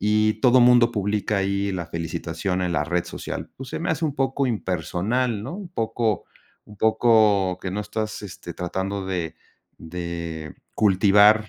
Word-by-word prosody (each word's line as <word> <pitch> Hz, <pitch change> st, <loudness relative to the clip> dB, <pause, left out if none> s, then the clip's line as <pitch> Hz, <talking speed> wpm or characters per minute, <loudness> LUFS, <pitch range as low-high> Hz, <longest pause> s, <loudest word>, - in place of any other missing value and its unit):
y 105 Hz, +1 st, +2 dB
todo 125 Hz, +1 st, +6 dB
mundo 120 Hz, -1 st, +6 dB
publica 105 Hz, -1 st, -1 dB
ahí 100 Hz, +1 st, 0 dB
la 90 Hz, -3 st, -3 dB
felicitación 85 Hz, +3 st, -3 dB
en 90 Hz, -1 st, 0 dB
la 75 Hz, -3 st, +1 dB
red 85 Hz, +2 st, -1 dB
social, -, -, -6 dB
pues, 135 Hz, -1 st, -8 dB
se -, -, -4 dB
me 165 Hz, -, -3 dB
hace 160 Hz, 0 st, -1 dB
un 150 Hz, -3 st, -1 dB
poco 135 Hz, 0 st, +1 dB
impersonal, 105 Hz, +3 st, -1 dB
¿no? 135 Hz, -, -5 dB
Un 195 Hz, -2 st, -7 dB
poco 115 Hz, -, -1 dB, 0.4 s
un 105 Hz, -, -14 dB
poco 110 Hz, -4 st, +4 dB
que 95 Hz, -, -4 dB
no 100 Hz, +3 st, -2 dB
estás, 110 Hz, 0 st, -4 dB
este, 90 Hz, -3 st, -8 dB
tratando 95 Hz, +2 st, -3 dB
de 85 Hz, -4 st, -3 dB, 0.4 s
de 85 Hz, -2 st, -6 dB, 0.2 s
cultivar, 105 Hz, +2 st, +5 dB
105 Hz, 160 wpm, -24 LUFS, 90-115 Hz, 0.4 s, todo